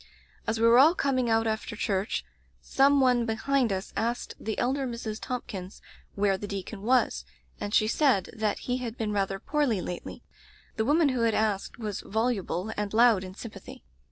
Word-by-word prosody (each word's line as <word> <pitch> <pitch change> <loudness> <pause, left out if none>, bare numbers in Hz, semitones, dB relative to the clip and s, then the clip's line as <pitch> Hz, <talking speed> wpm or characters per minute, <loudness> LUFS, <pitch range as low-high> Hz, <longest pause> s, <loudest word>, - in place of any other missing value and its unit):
"As 225 0 0
we 230 - +3
were 235 +2 +7
all 315 +6 +7
coming 255 -6 +1
out 225 0 +2
after 220 0 -2
church, 195 -1 -1 0.3
some 280 +1 +3
one 250 -2 +4
behind 245 +1 +1
us 190 +1 -4
asked 235 +2 -2
the 220 -1 -4
elder 265 +2 0
Mrs. 230 -3 -5
Thompkins 200 -7 -6 0.4
where 195 -1 +1
the 205 - -5
deacon 195 +1 -6
was, 250 +4 +2 0.4
and 205 - -4
she 215 - +3
said 240 -6 +2
that 215 -2 -1
he 250 0 0
had 240 -2 -5
been 220 -4 -2
rather 195 -1 0
poorly 280 -4 0
lately. 175 0 -6 0.5
The 220 - 0
woman 300 +3 +4
who 255 -3 -1
had 230 -1 +2
asked 210 -3 -1
was 215 -4 -4
voluble 220 -3 -1
and 205 -1 -3
loud 230 -4 +5
in 185 0 -9
sympathy. 220 - -10
225 Hz, 180 wpm, -28 LUFS, 205-250 Hz, 0.5 s, were